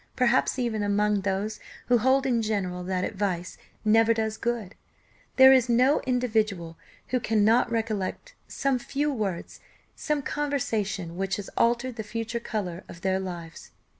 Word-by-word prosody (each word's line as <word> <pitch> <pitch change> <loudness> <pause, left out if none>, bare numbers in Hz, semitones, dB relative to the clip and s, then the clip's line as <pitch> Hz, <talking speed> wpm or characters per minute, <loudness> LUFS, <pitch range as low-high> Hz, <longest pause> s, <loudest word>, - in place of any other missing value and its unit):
Perhaps 250 +1 +2
even 235 -4 -1
among 205 0 +1
those 200 +2 -2 0.3
who 245 -1 +3
hold 260 +3 +3
in 240 -3 +2
general 190 -5 -2
that 185 0 -1
advice 185 -3 -3 0.3
never 225 +1 +4
does 220 -1 -1
good, 225 -4 -3 0.6
there 265 0 +9
is 255 -2 +3
no 255 +5 +4
individual 215 -9 0 0.3
who 255 - +1
cannot 225 +1 +3
recollect 225 - -3
some 270 -2 0
few 285 +4 -1
words 200 -8 -4 0.4
some 300 -2 -2
conversation 220 - -2
which 195 0 -1
has 205 - -6
altered 240 +1 +1
the 220 - -3
future 225 +2 -4
colour 190 -7 -4
of 170 - -11
their 190 0 +1
lives. 175 -3 -7
220 Hz, 145 wpm, -26 LUFS, 195-245 Hz, 0.6 s, there